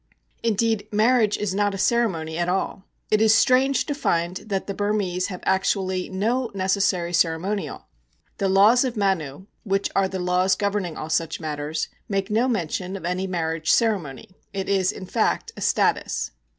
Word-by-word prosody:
Indeed, 225 -1 0
marriage 220 0 +3
is 205 -3 -2
not 205 0 +1
a - - -4
ceremony 185 -8 0
at 175 +1 -1
all. 190 +1 -2 0.3
It 215 0 +3
is 220 0 +6
strange 265 +2 +3
to 290 - -2
find 175 -10 0
that 200 -2 -3
the 200 - -4
Burmese 200 -3 -1
have 180 -2 -8
actually 190 -1 0
no 230 +6 0
necessary 190 -2 0
ceremonial. 175 +4 -1 0.5
The 195 - +1
Laws 210 +6 +5
of 250 -3 -3
Manu, 190 -5 -1 0.2
which 195 -1 0
are 195 -1 +3
the 190 - -5
laws 180 +1 +2
governing 200 -4 -2
all 155 - -5
such 165 0 0
matters, 150 -1 -3 0.2
make 195 0 -1
no 230 +4 +2
mention 185 -4 -2
of 190 - -7
any 180 +2 -1
marriage 165 -3 -2
ceremony; 195 - 0 0.2
it 195 -1 -3
is, 190 -2 +2
in 185 - -8
fact, - - 0
a - - -9
status. - - +1
195 Hz, 165 wpm, -24 LUFS, 180-210 Hz, 0.5 s, is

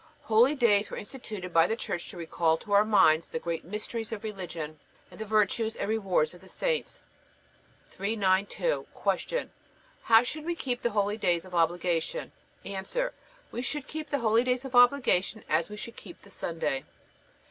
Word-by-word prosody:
Holydays 225 -2 +4
were - - -6
instituted 205 -6 -7
by 165 0 +6
the 225 - 0
Church 175 -6 -4
to - - -9
recall 165 -1 +1
to 205 - -12
our 200 +1 +6
minds 180 -7 +4
the - - -3
great 165 0 -3
mysteries 215 +4 -5
of 220 -1 -5
religion 170 -7 -6 0.3
and - - -13
the 220 - -4
virtues 220 +1 +1
and - - -3
rewards 195 -8 +1
of 180 - -14
the 190 - -16
saints. - - -2 0.9
392. 200 - 0 0.4
Q. - - -2 0.5
How 225 +1 +6
should 305 +5 -4
we 345 0 -1
keep 250 -6 -3
the 235 - +1
holydays 205 -4 +1
of 185 - -13
obligation? 175 - 0 0.3
A. 195 -1 -4 0.7
We 240 - -3
should 290 +3 -3
keep 310 0 -6
the 285 - +1
holydays 245 +3 +2
of 265 - -7
obligation 245 -5 +4
as 160 +4 +1
we 210 - -7
should 230 +2 -7
keep 175 -4 -12
the 200 - -16
Sunday. 150 -7 -2
210 Hz, 165 wpm, -29 LUFS, 175-235 Hz, 0.9 s, by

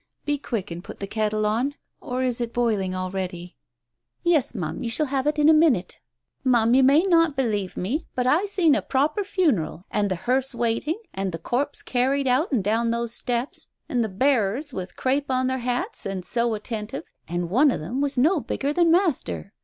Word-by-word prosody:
Be 290 -1 0
quick 210 -9 -4
and 170 +1 -6
get - - -10
the 200 - -3
kettle 215 +1 -1
on, 240 +7 0 0.2
or 255 +1 -3
is 250 -1 -1
it 235 -1 -4
boiling 210 -6 0
already? 185 -1 -4 0.3
" - - -59 0.3
"Yes, 315 -8 +2
Ma'am, 165 -6 -4
you 235 - -2
shall 265 +7 +1
have 270 0 -1
it 300 0 +1
in 300 0 +4
a 315 - +8
minute. 300 - +2 0.4
Ma'am, 240 -3 +3
you 265 - +6
may 280 +5 +5
not 330 -5 +3
believe 210 -8 -1
me, 270 - -2
but 250 - 0
I 305 +10 +3
seen 365 -6 +3
a - - +2
proper 295 +10 0
funeral, 280 - 0
and 205 -1 +1
the 185 - 0
hearse 255 +8 -1
waiting, 235 - -1
and 195 -1 -2
the 165 - -4
corpse 265 - -2
carried 265 +2 +1
out 260 +8 +2
and 240 -8 +1
down 225 +3 +1
those 235 0 -1
steps... 245 +2 -2 0.2
and 245 -2 0
the 220 - -2
bearers 255 +4 +1
with 185 -3 -6
crape 275 +2 0
on 255 0 +1
their 260 0 -1
hats 245 -3 -2
and 190 -2 -4
so 235 -1 +1
attentive, 210 -5 -5 0.2
and 175 +1 -3
one 275 +8 +5
of - - -1
them 235 - -3
was 280 -1 -1
no 315 +8 +4
bigger 280 +1 -2
than 340 +1 +3
Master. 320 - 0
245 Hz, 205 wpm, -24 LUFS, 205-285 Hz, 0.4 s, a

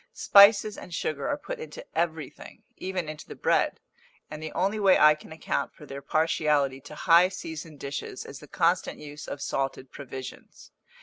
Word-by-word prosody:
Spices 205 +1 +6
and - - -11
sugar 145 -2 -2
are 290 - 0
put - - -7
into 470 +2 -9
everything, 160 -4 -4
even 185 -3 -4
into 155 0 -8
the - - -9
bread; - - +1 0.5
and 155 0 -7
the 155 - -5
only 200 +4 0
way 195 -2 +5
I 150 0 +7
can 150 +1 -13
account 160 - -3
for 150 - -13
their 140 -1 -8
partiality 150 -3 +1
to 145 +2 -11
high 175 +2 +5
seasoned 160 -4 -8
dishes 140 0 -6
is - - -9
the - - -13
constant - - +1
use 150 0 -9
of 140 - -5
salted 135 -1 -3
provisions. 130 -2 -10
155 Hz, 175 wpm, -27 LUFS, 145-185 Hz, 0.5 s, I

